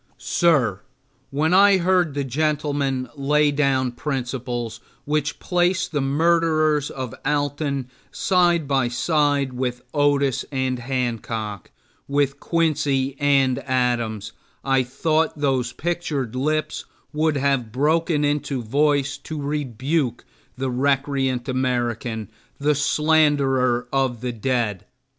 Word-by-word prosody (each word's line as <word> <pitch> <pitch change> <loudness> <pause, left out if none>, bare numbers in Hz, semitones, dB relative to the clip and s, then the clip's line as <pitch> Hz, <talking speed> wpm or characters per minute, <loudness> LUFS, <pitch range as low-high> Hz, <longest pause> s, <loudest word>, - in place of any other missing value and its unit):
Sir, 130 - +2 0.5
when 155 +5 +1
I 200 +1 +6
heard 180 -4 +2
the 140 - -1
gentleman 140 -1 -1
lay 145 +1 +2
down 135 -3 +1
principles 120 -3 -4 0.3
which 145 -1 -1
place 180 +1 +1
the 150 -4 -2
murderers 155 0 +2
of 130 -4 -6
Alton 145 -2 -1 0.2
side 175 -4 +2
by 135 -3 +2
side 145 +1 +1
with 125 -1 -3
Otis 145 -3 +2
and 130 -2 -1
Hancock, 115 -5 -3 0.4
with 140 0 0
Quincy 140 -5 0
and 135 -3 +3
Adams, 120 -5 -1 0.3
I 135 -1 +3
thought 155 +5 0
those 135 -4 0
pictured 145 -6 -3
lips 155 +4 -1 0.3
would 155 0 +1
have 135 -5 0
broken 150 +3 +1
into 145 -3 -1
voice 140 +3 +1
to 155 +2 -6
rebuke 140 -2 -2 0.3
the 130 0 -2
recreant 135 -1 0
American, 120 -4 -2 0.3
the 150 +1 +2
slanderer 140 -5 +2
of 130 -4 0
the 125 -1 -2
dead. 115 -4 -2
140 Hz, 110 wpm, -22 LUFS, 125-150 Hz, 0.5 s, I